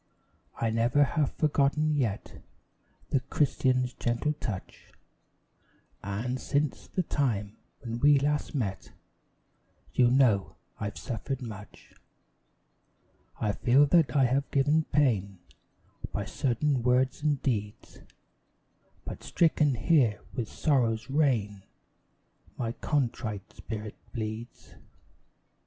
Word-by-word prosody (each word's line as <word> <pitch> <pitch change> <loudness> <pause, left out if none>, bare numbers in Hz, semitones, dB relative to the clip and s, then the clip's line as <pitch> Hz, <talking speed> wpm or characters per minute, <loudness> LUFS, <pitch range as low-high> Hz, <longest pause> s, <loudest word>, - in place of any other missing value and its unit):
I 115 -1 +1
never 120 +6 +3
have 145 0 0
forgotten 150 0 +2
yet 115 -8 -2 0.7
The 135 - +3
Christian's 130 -2 +1
gentle 120 +6 -1
touch; 110 -10 -7 1.1
And, 110 +6 -3
since 145 -1 -1
the 185 - -1
time 110 -10 -1 0.2
when 115 -2 -5 0.2
last 145 +2 -1
we - - +1
met, 95 -4 -5 1.0
You 125 -1 +4
know 120 -7 +3 0.2
I've 105 0 -4
suffered 130 +2 -4
much. 105 -3 -10 1.5
I 105 - +1
feel 125 +6 +4
that 150 -4 +3
I 135 - +5
have 135 +3 0
given 150 +3 +2
pain 105 -10 +1 0.7
By 100 - -3
certain 130 +4 0
words 125 +3 +2
and 145 -2 +1
deeds, 105 -5 -3 1.1
But - - -7
stricken 155 -5 +2
here 120 -4 +3
with 120 -5 -3
Sorrow's 120 -5 0
rain, 115 -9 +1 1.0
My 115 -2 -2
contrite 115 -7 -2
spirit 110 -1 -6 0.2
bleeds. 110 0 -6
125 Hz, 105 wpm, -29 LUFS, 110-145 Hz, 1.5 s, I